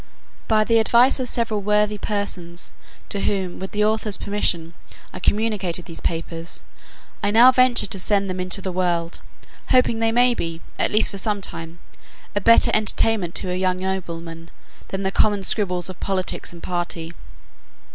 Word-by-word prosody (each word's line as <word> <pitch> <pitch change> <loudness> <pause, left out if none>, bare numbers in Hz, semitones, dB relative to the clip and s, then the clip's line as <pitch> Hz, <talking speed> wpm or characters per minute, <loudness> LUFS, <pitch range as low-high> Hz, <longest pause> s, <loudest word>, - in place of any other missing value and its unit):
By 215 -1 +3
the 230 +1 +3
advice 240 +4 +4
of 255 -1 0
several 225 -3 -1
worthy 210 +1 +1
persons, 180 -5 -3 0.4
to 200 - -2
whom, 190 -3 -2
with 190 - -5
the 210 0 +1
author's 215 -1 0
permission, 170 -5 -1 0.4
I - - -7
communicated 200 -4 +1
these 165 -2 -5
papers, 165 0 -4 0.6
I 205 - 0
now 235 +5 +7
venture 255 -1 +4
to 195 -1 -3
send 200 +1 +1
them 185 -1 -4
into 185 +1 -1
the 190 - -3
world, 175 -2 -1 0.5
hoping 250 -3 +3
they 225 0 +1
may 245 +1 +4
be, 165 -6 -4 0.2
at - - +2
least 215 - +3
for 195 - -4
some 210 0 0
time, 165 -3 -4 0.6
a 205 - 0
better 230 +3 +5
entertainment 215 -3 +2
to 185 - -2
our - - -1
young 185 0 0
noblemen, 170 -3 -5 0.4
than 195 0 -4
the 190 - -1
common 205 -1 +2
scribbles 180 -4 +1
of 185 -2 -6
politics 190 -2 -2
and 170 -1 -13
party. 175 -2 -4
195 Hz, 165 wpm, -22 LUFS, 175-215 Hz, 0.6 s, now